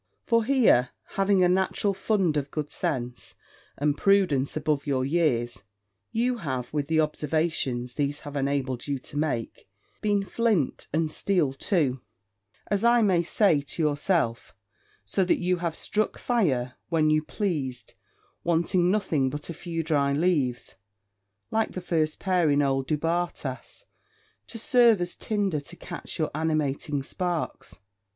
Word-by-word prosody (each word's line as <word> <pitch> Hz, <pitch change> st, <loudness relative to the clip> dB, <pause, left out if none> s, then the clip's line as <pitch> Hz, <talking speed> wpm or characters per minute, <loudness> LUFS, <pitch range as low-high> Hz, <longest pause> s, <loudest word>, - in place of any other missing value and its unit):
For 230 Hz, -1 st, +2 dB
here, 225 Hz, -, +4 dB, 0.2 s
having 195 Hz, -1 st, +2 dB
a -, -, +5 dB
natural 190 Hz, +2 st, +1 dB
fund 190 Hz, -4 st, +1 dB
of 145 Hz, -1 st, -1 dB
good 150 Hz, -1 st, -4 dB
sense, 120 Hz, -3 st, -4 dB, 0.4 s
and 145 Hz, 0 st, +1 dB
prudence 165 Hz, -9 st, +2 dB
above 150 Hz, -2 st, -1 dB
your 130 Hz, -2 st, +1 dB
years, 125 Hz, -, 0 dB, 0.5 s
you 240 Hz, +2 st, 0 dB
have, 130 Hz, -, -4 dB
with 145 Hz, -2 st, -1 dB
the 160 Hz, 0 st, +2 dB
observations 150 Hz, -5 st, -1 dB
these 145 Hz, +1 st, -2 dB
have 145 Hz, 0 st, -8 dB
enabled 135 Hz, -2 st, -1 dB
you 140 Hz, -1 st, -1 dB
to 145 Hz, +3 st, -10 dB
make, 140 Hz, -10 st, -2 dB, 0.3 s
been 205 Hz, -2 st, +1 dB
flint 215 Hz, -, 0 dB
and 160 Hz, 0 st, 0 dB
steel 165 Hz, -7 st, +1 dB
too, 135 Hz, -, 0 dB, 0.6 s
as 205 Hz, 0 st, -1 dB
I 235 Hz, 0 st, +5 dB
may 185 Hz, -4 st, +3 dB
say, 170 Hz, -3 st, +2 dB
to 145 Hz, +4 st, -3 dB
yourself: 145 Hz, -4 st, 0 dB, 0.5 s
so 190 Hz, -, +1 dB
that 180 Hz, -, +2 dB
you 180 Hz, 0 st, 0 dB
have 170 Hz, -2 st, -2 dB
struck 215 Hz, 0 st, -1 dB
fire 135 Hz, -, 0 dB, 0.2 s
when 155 Hz, -2 st, +3 dB
you 155 Hz, 0 st, +3 dB
pleased, 155 Hz, -, -3 dB, 0.5 s
wanting 175 Hz, +1 st, +2 dB
nothing 160 Hz, -9 st, +1 dB
but 150 Hz, +4 st, -6 dB
a -, -, -5 dB
few 165 Hz, 0 st, -4 dB
dry 145 Hz, -3 st, +1 dB
leaves, 145 Hz, -6 st, 0 dB, 0.7 s
like 225 Hz, 0 st, 0 dB
the -, -, -4 dB
first 160 Hz, -3 st, -1 dB
pair 180 Hz, -4 st, +2 dB
in 145 Hz, 0 st, +3 dB
old 135 Hz, -1 st, 0 dB
Du 155 Hz, -, +1 dB
Bartas, 165 Hz, -, -3 dB, 0.6 s
to 230 Hz, -, -8 dB
serve 240 Hz, -4 st, +4 dB
as 175 Hz, 0 st, -3 dB
tinder 200 Hz, -7 st, -1 dB
to 165 Hz, +5 st, -12 dB
catch 175 Hz, 0 st, -8 dB
your 155 Hz, -, -1 dB
animating 150 Hz, -2 st, -1 dB
sparks. 175 Hz, +2 st, -4 dB
155 Hz, 145 wpm, -26 LUFS, 140-185 Hz, 0.7 s, a